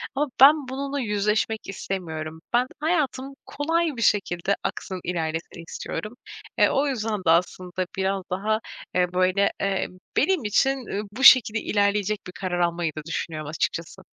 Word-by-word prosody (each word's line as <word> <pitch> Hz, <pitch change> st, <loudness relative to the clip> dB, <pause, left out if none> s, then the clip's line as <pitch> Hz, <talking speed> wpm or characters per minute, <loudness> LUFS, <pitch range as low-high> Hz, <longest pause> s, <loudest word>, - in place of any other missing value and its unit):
ama 295 Hz, +2 st, +1 dB
ben 285 Hz, 0 st, +7 dB
bununla 275 Hz, +1 st, -3 dB
yüzleşmek 210 Hz, 0 st, 0 dB
istemiyorum. 160 Hz, -5 st, -5 dB
Ben, 245 Hz, +1 st, +4 dB
hayatım 285 Hz, -4 st, -1 dB
kolay 320 Hz, -1 st, -1 dB
bir -, -, -4 dB
şekilde 200 Hz, -3 st, +1 dB
aksın, 185 Hz, -1 st, -4 dB
ilerlesin 165 Hz, -1 st, -3 dB
istiyorum. 215 Hz, +2 st, -5 dB, 0.4 s
E, -, -, +5 dB
o 285 Hz, +2 st, +1 dB
yüzden 220 Hz, -5 st, -2 dB
de 160 Hz, -, +3 dB
aslında 180 Hz, +1 st, 0 dB
biraz 190 Hz, 0 st, 0 dB
daha, 215 Hz, +4 st, 0 dB, 0.4 s
eee, 180 Hz, -1 st, +1 dB
böyle, 185 Hz, +2 st, +2 dB
eee, 195 Hz, -1 st, 0 dB, 0.3 s
benim 350 Hz, -3 st, +2 dB
için, 265 Hz, +4 st, +1 dB
ııı, 205 Hz, -, -2 dB
bu 265 Hz, +5 st, -4 dB
şekilde 225 Hz, -5 st, +8 dB
ilerleyecek 205 Hz, 0 st, +1 dB
bir 180 Hz, -, -7 dB
karar 180 Hz, -1 st, -3 dB
almayı 170 Hz, -1 st, 0 dB
da -, -, -3 dB
düşünüyorum 155 Hz, -2 st, -4 dB
açıkçası. 165 Hz, +3 st, -3 dB
200 Hz, 150 wpm, -24 LUFS, 180-260 Hz, 0.4 s, şekilde